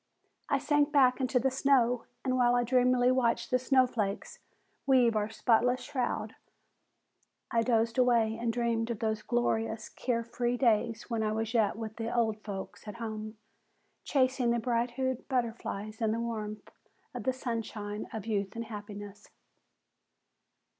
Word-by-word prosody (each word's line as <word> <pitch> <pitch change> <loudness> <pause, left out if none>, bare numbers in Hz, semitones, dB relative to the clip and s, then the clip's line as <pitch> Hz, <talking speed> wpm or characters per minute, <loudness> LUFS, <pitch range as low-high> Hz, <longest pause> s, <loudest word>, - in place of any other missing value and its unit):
I 280 - +3
sank 290 +1 +2
back 265 -3 +4
into 255 0 +2
the 265 +2 +1
snow 250 -3 +2 0.2
and 255 -1 +1
while 245 -1 +4
I 245 - +3
dreamily 250 0 +3
watched 245 -2 +1
the 255 - +3
snowflakes 250 -6 0 0.5
weave 250 -4 +4
our 210 0 0
spotless 245 +3 +2
shroud, 255 -3 -2 1.2
I 230 - +3
dozed 230 0 +1
away 235 -3 +3
and 230 0 -1
dreamed 230 -1 0
of 235 - -2
those 220 -1 -1
glorious, 225 -1 -1
care 235 -2 -2
free 240 +1 -1
days 230 -1 +1
when 230 -1 0
I 215 -1 0
was 225 +1 -2
yet 220 -4 +2
with 220 -1 -6
the 230 0 -3
"old 220 -3 +1
folks" 200 +1 -7
at 210 - -6
home, 215 -1 -6 0.7
chasing 255 -3 +2
bright 235 +1 0
hued 260 +1 -3
butterflies 225 -3 -3
in 220 -1 +2
the 230 - -2
warmth 215 -3 -5 0.4
of 245 - -5
the 260 - +2
sunshine 220 -4 -4
of 220 -3 -6
youth 200 -3 -2
and 230 0 -4
happiness. 205 -1 -9
235 Hz, 150 wpm, -30 LUFS, 220-250 Hz, 1.2 s, back